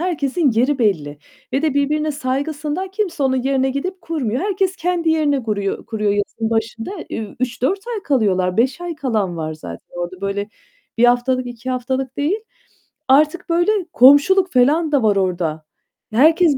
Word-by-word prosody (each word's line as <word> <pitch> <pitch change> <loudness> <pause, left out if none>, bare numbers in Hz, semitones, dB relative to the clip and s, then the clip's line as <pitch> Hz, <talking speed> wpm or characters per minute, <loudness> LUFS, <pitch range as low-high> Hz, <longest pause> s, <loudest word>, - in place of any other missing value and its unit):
herkesin 320 -3 0
yeri 255 +5 +1
belli 155 - 0 0.3
ve 270 - 0
de 310 -3 +1
birbirine 300 +2 +1
saygısından 295 +6 -3
kimse 385 -6 -2
onun 260 -1 +1
yerine 265 0 +1
gidip 365 +8 -4
kurmuyor. 265 -9 -2
Herkes 380 -1 0
kendi 345 -2 0
yerine 300 -3 +2
guruyor 210 -5 -3
kuruyor 215 -3 -1
yazın 205 +2 -2
başında. 225 +2 -2 0.2
Üüü, 215 -3 -5
3-4 255 +9 0 0.2
ay 420 - -5
kalıyorlar. 190 - +1
5 260 +7 +1
ay 350 -1 -4
kalan 220 - -1
var 155 -1 -4
zaten 85 - -10
orada. 175 +1 -5
Böyle 200 +1 -2 0.5
1 235 - +5
haftalık 245 +1 +2
2 245 +1 -6
haftalık 255 +1 -3
değil. 325 +10 0 0.7
Artık 305 +7 +3
böyle 345 +4 +3 0.2
komşuluk 290 +9 +6
falan 295 +6 +3
da 280 -5 +2
var 210 -2 +3
orada. 175 -5 -1 0.5
Herkes 315 +4 +4
265 Hz, 155 wpm, -19 LUFS, 220-315 Hz, 0.7 s, komşuluk